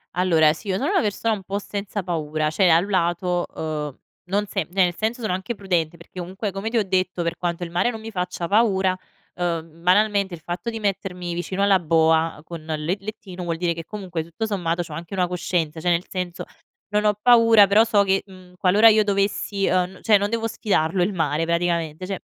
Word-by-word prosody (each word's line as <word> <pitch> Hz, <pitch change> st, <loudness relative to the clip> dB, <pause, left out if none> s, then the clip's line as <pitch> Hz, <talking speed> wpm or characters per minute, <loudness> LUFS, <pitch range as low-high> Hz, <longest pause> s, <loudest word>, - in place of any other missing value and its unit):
Allora 165 Hz, -4 st, +4 dB
si, 165 Hz, -, -12 dB
io 190 Hz, -, 0 dB
sono 280 Hz, -, -1 dB
una 400 Hz, -, +3 dB
persona 220 Hz, +1 st, 0 dB
un 205 Hz, -, -4 dB
po' 195 Hz, +2 st, -4 dB
senza 205 Hz, 0 st, -4 dB
paura, 155 Hz, -3 st, -1 dB
cioè 180 Hz, +2 st, +3 dB
da 160 Hz, -, +7 dB
un 180 Hz, +4 st, 0 dB
lato, 175 Hz, -1 st, 0 dB
ehm, 150 Hz, -3 st, -5 dB, 0.3 s
non 200 Hz, +3 st, 0 dB
se 195 Hz, -5 st, -3 dB
cioè 190 Hz, +1 st, +3 dB
nel 175 Hz, -, +1 dB
senso 230 Hz, +3 st, -2 dB
sono 215 Hz, -5 st, -1 dB
anche 190 Hz, +6 st, -3 dB
prudente, 175 Hz, -4 st, -1 dB
perché 170 Hz, +2 st, -12 dB
comunque 190 Hz, +4 st, -4 dB
come 195 Hz, +4 st, -4 dB
ti 235 Hz, -, -1 dB
ho 220 Hz, -, +3 dB
detto 185 Hz, -1 st, 0 dB
per 170 Hz, 0 st, -2 dB
quanto 175 Hz, 0 st, -3 dB
il 170 Hz, -, -6 dB
mare 175 Hz, +8 st, +1 dB
non 225 Hz, -2 st, -5 dB
mi 225 Hz, +1 st, -8 dB
faccia 180 Hz, -2 st, -3 dB
paura, 195 Hz, -3 st, +3 dB, 0.4 s
ehm, 165 Hz, -2 st, -4 dB
banalmente 200 Hz, 0 st, +2 dB
il 160 Hz, -, -16 dB
fatto 175 Hz, +8 st, -4 dB
di 225 Hz, -, -5 dB
mettermi 180 Hz, -4 st, -3 dB
vicino 185 Hz, +3 st, -2 dB
alla 200 Hz, -1 st, +4 dB
boa 160 Hz, -1 st, +2 dB
con 165 Hz, -1 st, -9 dB
le 155 Hz, +3 st, -2 dB
lettino 195 Hz, -3 st, -8 dB
vuol 170 Hz, -1 st, -2 dB
dire 170 Hz, -1 st, 0 dB
che 165 Hz, -1 st, -8 dB
comunque 180 Hz, -6 st, -5 dB
tutto 170 Hz, +7 st, -4 dB
sommato 175 Hz, -4 st, -1 dB
c'ho 160 Hz, -, -10 dB
anche 170 Hz, +4 st, -7 dB
una 185 Hz, -1 st, +2 dB
coscienza, 170 Hz, -3 st, -2 dB
cioè 175 Hz, -, 0 dB
nel 175 Hz, +1 st, +1 dB
senso, 180 Hz, -2 st, -4 dB, 0.5 s
non 210 Hz, 0 st, +1 dB
ho 210 Hz, 0 st, +3 dB
paura 230 Hz, -3 st, +7 dB
però 205 Hz, +3 st, +5 dB
so 215 Hz, -3 st, +3 dB
che, 195 Hz, 0 st, +1 dB
mhmm, 185 Hz, -2 st, -16 dB
qualora 205 Hz, +5 st, +6 dB
io 215 Hz, 0 st, +5 dB
dovessi, 200 Hz, 0 st, 0 dB
ehm, 180 Hz, 0 st, +1 dB
n -, -, -17 dB
cioè 215 Hz, -2 st, +6 dB
non 205 Hz, -, 0 dB
devo 225 Hz, 0 st, -1 dB
sfidarlo 190 Hz, -6 st, 0 dB
il 180 Hz, +4 st, +2 dB
mare 160 Hz, -3 st, 0 dB
praticamente. 170 Hz, -1 st, -1 dB
Cioè 195 Hz, 0 st, -4 dB
185 Hz, 220 wpm, -23 LUFS, 170-205 Hz, 0.5 s, da